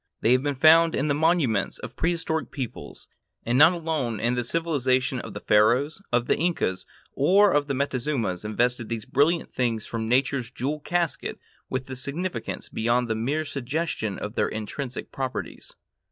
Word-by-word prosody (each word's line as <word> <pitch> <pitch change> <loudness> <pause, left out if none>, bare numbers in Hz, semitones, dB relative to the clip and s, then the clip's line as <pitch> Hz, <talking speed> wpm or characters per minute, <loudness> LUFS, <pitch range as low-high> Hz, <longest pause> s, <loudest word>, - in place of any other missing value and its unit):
They 115 - +3
have 130 0 +4
been 145 0 -1
found 160 +4 +6
in 150 +3 0
the - - +3
monuments 145 - +1
of 125 0 -9
prehistoric 165 -1 -1
peoples, 130 -5 -7 0.4
and 120 - 0
not 155 +6 +7
alone 155 -9 -2
the 120 +2 0
civilization 130 -4 0
of 115 -3 -8
the - - -4
Pharaohs, 120 - +3
of 120 0 +2
the - - +2
Incas, 160 - -1 0.3
or 195 +8 +4
of 145 0 +2
the 140 - -1
Montezumas 130 -8 -1
invested 120 +2 0
these 115 -2 -4
brilliant 160 +5 +1
things 115 -4 -1
from 115 -1 -4
Nature's 130 -1 +1
jewel 140 +5 -3
casket 170 +1 -2 0.3
with 130 0 -3
a 130 - -6
significance 155 +8 -4
beyond 120 +2 0
the 110 - 0
mere 140 +8 -1
suggestion 140 - -3
of 105 - -5
their - - +1
intrinsic 120 +4 -5
properties. 130 -1 -5
130 Hz, 165 wpm, -25 LUFS, 120-155 Hz, 0.4 s, not